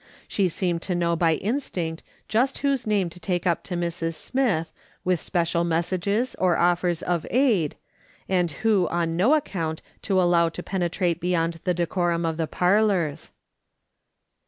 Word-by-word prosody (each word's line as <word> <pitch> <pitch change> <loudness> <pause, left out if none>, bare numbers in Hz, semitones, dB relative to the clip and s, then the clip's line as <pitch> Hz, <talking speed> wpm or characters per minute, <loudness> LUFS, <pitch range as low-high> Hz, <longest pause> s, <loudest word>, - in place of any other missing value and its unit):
She 195 -3 +1
seemed 175 0 -1
to 180 - -2
know 170 -1 +1
by 165 -1 +3
instinct 185 - -3 0.3
just 250 +5 +1
whose 275 -5 +1
name 205 -4 +2
to 180 - -12
take 175 +1 -2
up 170 -2 +1
to 180 - -4
Mrs. 170 -1 -2
Smith, 200 -9 -1 0.3
with 180 -2 +1
special 170 -1 0
messages, 185 +8 0
or 180 -2 +3
offers 175 -1 +1
of 175 -3 0
aid, 230 - +2 0.5
and 180 -2 +1 0.2
who 205 -5 +4
on 170 -1 -1
no 220 - +4
account 165 - -3 0.2
to 190 -2 +1
allow 175 -2 +4
to 175 +2 -8
penetrate 175 -2 -1
beyond 165 -1 0
the 180 -1 +1
decorum 175 0 0
of 160 -1 -1
the 165 -1 -1
parlours. 180 -5 +1
175 Hz, 155 wpm, -25 LUFS, 170-195 Hz, 0.5 s, who